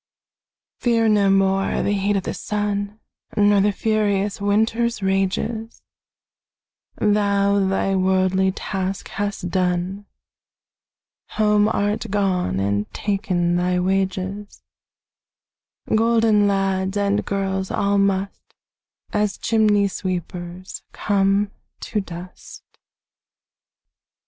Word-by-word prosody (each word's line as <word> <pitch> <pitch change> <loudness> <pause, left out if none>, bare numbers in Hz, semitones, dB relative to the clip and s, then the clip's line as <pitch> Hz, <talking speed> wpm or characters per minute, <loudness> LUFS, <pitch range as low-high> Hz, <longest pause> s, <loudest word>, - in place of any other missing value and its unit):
Fear 230 -2 +2
no 205 -2 +3
more 195 0 +2
the - - 0
heat 205 0 +1
o' - - 0
the - - -4
sun, 205 0 -3 0.4
Nor 205 -1 +4
the 205 +1 +3
furious 205 -1 0
winter's 220 +2 +1
rages; 195 +4 -1 1.1
Thou 200 -1 +2
thy 195 0 0
worldly 190 0 +2
task 190 0 -4
hast 200 -3 -3
done, 185 +2 -1 1.3
Home 210 -1 +3
art 205 -1 -1
gone, 185 - 0
and 100 +1 -1
ta'en 185 -4 0
thy 180 0 +1
wages: 190 +2 -2 1.3
Golden 225 -2 +3
lads 195 0 0
and 200 0 +1
girls 190 -1 -2
all 200 0 +1
must, 195 0 -1 0.6
As 210 -1 0
chimney 210 -3 +2
sweepers, 180 -1 -5
come 200 0 +1 0.3
to 210 - -2
dust. 180 -1 -10
200 Hz, 95 wpm, -22 LUFS, 190-205 Hz, 1.3 s, Nor